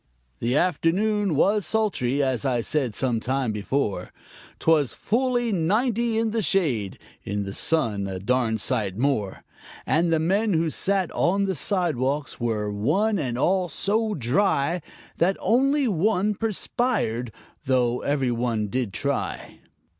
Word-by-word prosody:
The 120 +4 0
afternoon 185 +3 +1
was 205 +7 +3
sultry, 145 - 0
as 130 -2 -1
I 125 -4 +1
said 125 -2 -1
some 120 0 0
time 130 0 -1
before; 105 +1 -2 0.5
'Twas 155 -5 +2
fully 240 +1 0
ninety 220 +6 +1
in 225 -1 +1
the 225 0 0
shade 130 - 0 0.3
(in 100 +1 -3
the 100 0 -6
sun 110 -12 +1
a 95 -1 -4
darn 115 +3 0
sight 105 -4 0
more), 115 -7 -1 0.4
And 165 +2 +2
the 165 - +3
men 195 +6 +1
who 165 -1 +1
sat 195 0 0
on 195 +3 +1
the 195 -1 0
sidewalks 150 - -1
were, 110 -3 -1
one 190 - +1
and 125 -5 -2
all, 180 +5 +1
so 215 +7 0
dry 150 - +1 0.4
That 185 +3 +2
only 275 +3 +2
one 210 +1 +1
perspired, 210 - -1 0.3
though 125 -2 +1
every 135 -3 0
one 115 -3 -1
did 120 -3 -2
try. - - -3
150 Hz, 140 wpm, -24 LUFS, 120-200 Hz, 0.5 s, was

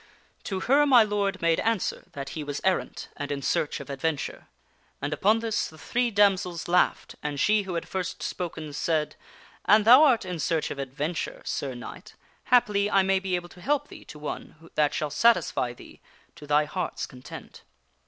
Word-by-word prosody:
" - - -36
To 190 -2 -3
her 285 +6 +4
my 250 -4 +7
lord 200 -3 -1
made 165 -1 +3
answer 225 -4 -1
that 140 -2 -6
he 155 - -5
was 145 -1 -4
errant 190 -1 -1
and 145 0 -4
in 140 -1 -3
search 150 - 0
of 140 - -9
ad 140 -1 -7
venture, 160 -3 -2 0.5
and 145 +2 -2
upon 215 +6 +2
this, 225 -2 -1
the 155 - -14
three 240 +9 0
damsels 195 -5 +2
laughed, 180 +1 +2
and 145 -1 -3
she 215 +5 +3
who 190 -3 -5
had 170 - -3
first 185 -2 -4
spoken 160 -4 -5
said, 150 +2 -1 0.3
' - - -26
An 210 +1 +6
thou 245 +6 +8
art 250 -9 +4
in 180 -2 -4
search 160 0 0
of 140 - -6
adventure, 140 +5 -4
Sir 135 -3 -3
Knight, 120 - -10 0.3
happily 210 -5 +3
I 195 -2 +4
may 190 0 +2
be 190 -1 -1
able 175 0 -4
to 180 - -15
help 290 +4 0
thee - - -11
to - - -11
one 155 +2 -8
that 150 -1 +2
shall 150 -1 -2
satisfy 180 - +2
thee 120 - -14 0.3
to 150 - -12
thy 150 +1 +3
heart's 180 +5 -3
con 125 -2 -14
tent.' - - -10
175 Hz, 200 wpm, -26 LUFS, 150-205 Hz, 0.5 s, thou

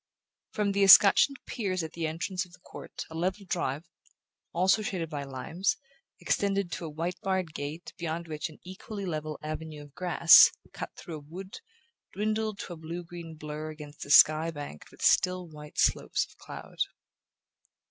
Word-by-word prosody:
From 205 -1 0
the 200 0 0
escutcheoned 200 +7 +8
piers 185 -6 -2
at 160 - -6
the 165 -1 -2
entrance 180 +4 -2
of 180 -2 -16
the - - -16
court - - -9
a - - -8
level 185 +5 -2
drive, 165 -3 -2 0.6
also 190 +5 +3
shaded 175 -5 -3
by 145 -2 -3
limes, 140 +8 -2 0.4
extended 200 -3 0
to 170 - -4
a - - -5
white 170 +4 -4
barred 185 -4 -1
gate 150 +3 -6
beyond 170 0 -3
which 155 +1 -4
an 155 - -14
equally 195 +2 -7
level 155 -3 -4
avenue 155 -1 -6
of 145 -1 -16
grass, 175 -1 +7 0.2
cut - - -5
through 165 -2 -7
a 145 0 -14
wood, 185 +4 -8 0.5
dwindled 215 0 -1
to 175 - -7
a - - -9
blue 165 +2 -6
green 170 -1 -9
blur 155 0 -6
against 150 -1 -9
a - - -10
sky 155 +2 +7
banked 145 - -8
with - - -11
still 180 -1 +3
white 150 -1 -12
slopes - - +2
of - - -21
cloud. - - -10
170 Hz, 170 wpm, -29 LUFS, 155-185 Hz, 0.6 s, escutcheoned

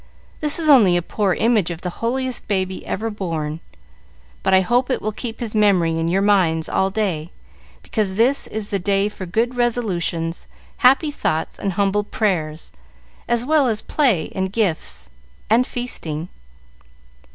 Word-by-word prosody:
This 300 -1 +1
is 325 -2 -2
only 215 -12 +6
a - - +1
poor 195 0 0
image 220 -6 +2
of 170 0 -6
the 180 - -3
holiest 255 +2 -2
baby 190 -2 -1
ever 225 +1 -2
born, 165 -6 -3 0.8
but - - +1
I 190 0 +6
hope 245 +6 +1
it 255 - 0
will 215 - -2
keep 225 +1 -6
his 230 -3 -4
memory 185 -6 +3
in 165 - 0
your 190 +3 +1
minds 175 -6 +2
all 190 - +1
day, 190 -6 -2 0.5
because 205 -4 -1
this 245 +6 +2
is 215 -1 -4
the 200 - -1
day 195 +2 +1
for 190 -3 -8
good 230 +8 0
resolutions, 190 -9 -1 0.3
happy 275 +4 +4
thoughts, 160 - -2
and 195 - -2
humble 200 +2 +1
prayers, 165 -8 -2 0.6
as 240 0 0
well 300 -1 +3
as 220 -3 -1
play 240 - +1
and 190 -1 -2
gifts 155 - -1 0.4
and 240 +3 +4
feasting." 170 -10 -4
200 Hz, 160 wpm, -21 LUFS, 175-235 Hz, 0.8 s, only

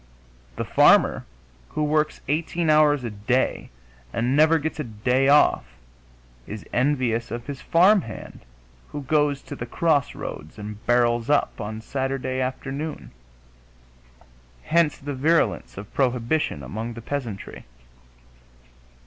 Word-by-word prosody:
The - - -3
farmer - - +4 0.4
who 155 - -2
works 150 0 0
18 160 +2 0
hours 150 -3 +4
a 120 - -4
day 105 +5 -1 0.4
and 120 +3 0
never 155 +2 +5
gets 160 +1 -4
a - - -1
day 125 +5 0
off 140 - +3 0.7
is 105 -1 -7
envious 125 -3 +1
of 120 0 -5
his 140 -2 -7
farmhand 185 +4 +2 0.5
who 145 -1 -6
goes 145 0 +1
to 145 - -8
the 120 - -6
crossroads 140 - -1
and 105 0 -8
barrels 120 0 +2
up 145 -4 +1
on 110 +1 -5
Saturday 130 0 -2
afternoon; 135 +4 -4 1.5
hence 165 -3 +2
the 145 +1 -5
virulence 155 -1 +1
of 100 +2 -9
prohibition 125 - 0
among 110 - -5
the 115 - -8
peasantry. 120 -9 -5
130 Hz, 120 wpm, -24 LUFS, 115-150 Hz, 1.5 s, never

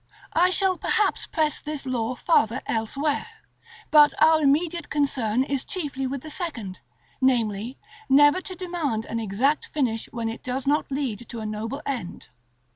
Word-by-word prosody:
§ - - -41
XIX. - - -40 0.3
I 355 +3 +4
shall 375 -1 +2
perhaps 425 - +1
press 310 -2 0
this 300 -2 -4
law 250 -1 -1
farther 245 -4 +2
elsewhere, 275 +7 -1 0.6
but 300 -1 +7
our 315 0 +6
immediate 315 +3 +1
concern 260 -5 +1
is 275 -1 -2
chiefly 285 -8 -3
with 270 0 -4
the 310 - -7
second, 235 - -4 0.4
namely, 235 -2 +1 0.3
never 290 +6 +6
to 370 - -7
demand 335 -12 -2
an 230 - -3
exact 230 +8 0
finish, 240 -7 -1
when 230 -1 -3
it 225 +1 -5
does 255 +1 -3
not 290 +2 +1
lead 255 -5 -3
to 235 - -6
a 220 - -5
noble 225 +7 -4
end. 245 -11 -5
275 Hz, 165 wpm, -25 LUFS, 230-305 Hz, 0.6 s, but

